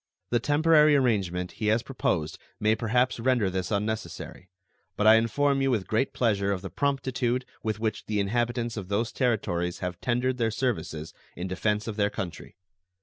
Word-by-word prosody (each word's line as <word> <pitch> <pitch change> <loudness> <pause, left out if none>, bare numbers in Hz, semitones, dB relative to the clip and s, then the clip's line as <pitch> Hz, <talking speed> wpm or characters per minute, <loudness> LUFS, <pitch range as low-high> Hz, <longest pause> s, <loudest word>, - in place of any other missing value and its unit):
The 120 - +3
temporary 150 +1 +4
arrangement 95 -9 +1
he 105 - +1
has 110 +2 +2
proposed 85 - -2 0.2
may 105 +1 +3
perhaps 120 +3 +1
render 115 -5 +2
this 95 -1 -2
unnecessary; 105 -3 -4 0.5
but 105 - +1
I 110 - +9
inform 135 +5 +2
you 135 - +2
with 110 -7 0
great 115 +5 0
pleasure 100 -5 +1
of 95 -2 -2
the 95 - -6
promptitude 130 - 0 0.2
with 110 -1 -2
which 110 -2 -2
the 105 -1 0
inhabitants 120 +3 -1
of 100 -3 -5
those 105 +4 -1
Territories 90 -8 0
have 90 -2 -5
tendered 125 +1 0
their 115 -1 +2
services 90 -10 -3 0.2
in 90 +2 -4
defense 105 +3 -1
of 110 -2 -4
their 100 -1 +2
country. 90 -3 -6
110 Hz, 170 wpm, -27 LUFS, 100-125 Hz, 0.5 s, I